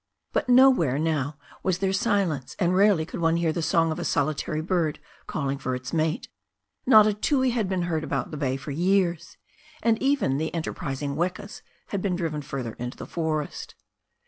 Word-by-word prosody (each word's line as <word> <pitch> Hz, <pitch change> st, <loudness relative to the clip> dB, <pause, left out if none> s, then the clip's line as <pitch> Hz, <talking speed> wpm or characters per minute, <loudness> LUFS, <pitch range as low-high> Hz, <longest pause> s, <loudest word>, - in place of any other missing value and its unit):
But -, -, 0 dB
nowhere 245 Hz, -, +5 dB
now 150 Hz, -2 st, -1 dB, 0.2 s
was 185 Hz, -2 st, 0 dB
there 190 Hz, 0 st, 0 dB
silence, 180 Hz, -9 st, 0 dB
and 180 Hz, 0 st, +1 dB
rarely 195 Hz, -4 st, +4 dB
could -, -, -7 dB
one 165 Hz, 0 st, +2 dB
hear 165 Hz, -2 st, +1 dB
the 170 Hz, -, -2 dB
song 165 Hz, 0 st, +2 dB
of 155 Hz, -, -3 dB
a -, -, -3 dB
solitary 150 Hz, 0 st, -1 dB
bird 165 Hz, -2 st, 0 dB, 0.3 s
calling 140 Hz, -2 st, -2 dB
for 130 Hz, -2 st, -2 dB
its 130 Hz, +3 st, -7 dB
mate. 160 Hz, 0 st, 0 dB, 0.6 s
Not 215 Hz, -5 st, +8 dB
a 215 Hz, -, +2 dB
tui 260 Hz, +4 st, +1 dB
had 225 Hz, -5 st, -1 dB
been 185 Hz, -2 st, 0 dB
heard 160 Hz, -3 st, -1 dB
about -, -, -2 dB
the -, -, -5 dB
bay 135 Hz, -2 st, -1 dB
for 140 Hz, +2 st, -7 dB
years, 175 Hz, +1 st, 0 dB, 0.5 s
and 225 Hz, -1 st, +2 dB
even 270 Hz, -, +1 dB
the 160 Hz, +1 st, -2 dB
enterprising 140 Hz, -3 st, -3 dB
wekas 180 Hz, +5 st, -3 dB, 0.3 s
had 200 Hz, -, -2 dB
been 185 Hz, -2 st, 0 dB
driven 160 Hz, -4 st, -2 dB
further 130 Hz, -5 st, -5 dB
into 125 Hz, +1 st, -5 dB
the -, -, -7 dB
forests. 155 Hz, -3 st, -3 dB
165 Hz, 185 wpm, -26 LUFS, 150-190 Hz, 0.6 s, Not